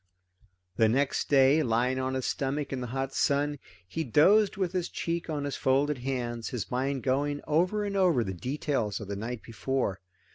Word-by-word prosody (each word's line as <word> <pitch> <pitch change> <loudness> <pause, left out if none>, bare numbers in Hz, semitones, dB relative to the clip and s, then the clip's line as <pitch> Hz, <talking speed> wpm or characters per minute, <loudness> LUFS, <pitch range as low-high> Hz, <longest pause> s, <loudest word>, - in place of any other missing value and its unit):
The 110 -1 +4
next 135 +4 0
day, 140 +2 +5
lying 125 0 +1
on 130 0 -1
his 130 - -2
stomach 140 +1 -2
in 130 - -3
the 125 - -4
hot 135 +2 -3
sun, 145 0 +1 0.3
he 160 - -3
dozed 195 - +4
with 185 -3 -1
his 180 -2 -1
cheek 170 0 -3
on 150 -2 -2
his 140 -1 -3
folded 140 +1 +1
hands, 120 -3 -3
his 120 -6 -5
mind 130 +1 -1
going 145 +2 0
over 180 +7 +1
and 200 -1 -3
over 175 -11 +3
the 95 -3 -4
details 125 - -2
of 105 - -7
the 100 - -4
night 115 +3 -5
before. 115 -3 -2
135 Hz, 185 wpm, -28 LUFS, 125-150 Hz, 0.3 s, day